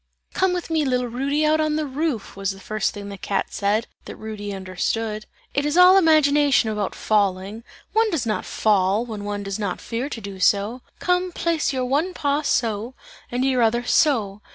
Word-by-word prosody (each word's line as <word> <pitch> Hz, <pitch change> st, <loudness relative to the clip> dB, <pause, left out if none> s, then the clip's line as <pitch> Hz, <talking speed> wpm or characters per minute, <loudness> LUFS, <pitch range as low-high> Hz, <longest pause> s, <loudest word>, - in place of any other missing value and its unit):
"Come 380 Hz, 0 st, +2 dB
with 355 Hz, -2 st, -4 dB
me, 320 Hz, -1 st, +2 dB
little 250 Hz, -2 st, 0 dB
Rudy, 275 Hz, +5 st, -1 dB
out 310 Hz, +1 st, +3 dB
on 310 Hz, -1 st, +1 dB
the 310 Hz, 0 st, -1 dB
roof!" 280 Hz, -4 st, -3 dB
was 195 Hz, 0 st, -2 dB
about 195 Hz, -, -10 dB
the -, -, -16 dB
first 215 Hz, -1 st, -1 dB
thing 205 Hz, -1 st, -8 dB
that 200 Hz, -2 st, -9 dB
the -, -, -7 dB
cat 200 Hz, -, -1 dB
said, 210 Hz, +3 st, 0 dB, 0.2 s
that -, -, -8 dB
Rudy 210 Hz, -2 st, -6 dB
understood. 210 Hz, +3 st, -3 dB, 0.3 s
"It 280 Hz, -, +1 dB
is 295 Hz, +3 st, 0 dB
all 360 Hz, +1 st, +8 dB
imagination 295 Hz, -, +4 dB
about 210 Hz, -2 st, -3 dB
falling; 200 Hz, +1 st, 0 dB, 0.3 s
one 445 Hz, 0 st, +3 dB
does 315 Hz, -, -1 dB
not 215 Hz, -2 st, -1 dB
fall, 205 Hz, +1 st, +1 dB
when 215 Hz, -4 st, -6 dB
one 205 Hz, 0 st, -3 dB
does 195 Hz, +1 st, -4 dB
not 200 Hz, -4 st, -2 dB
fear 245 Hz, +4 st, -4 dB
to 240 Hz, -, -5 dB
do 200 Hz, -2 st, -8 dB
so. 205 Hz, +6 st, +2 dB, 0.2 s
Come, 360 Hz, 0 st, 0 dB
place 330 Hz, -4 st, 0 dB
your 260 Hz, -2 st, -1 dB
one 300 Hz, +8 st, 0 dB
paw 285 Hz, 0 st, 0 dB
so, 230 Hz, -3 st, -1 dB, 0.4 s
and 250 Hz, +2 st, 0 dB
your 260 Hz, -2 st, +2 dB
other 235 Hz, +1 st, +2 dB
so! 220 Hz, -8 st, +2 dB
235 Hz, 200 wpm, -23 LUFS, 205-295 Hz, 0.4 s, all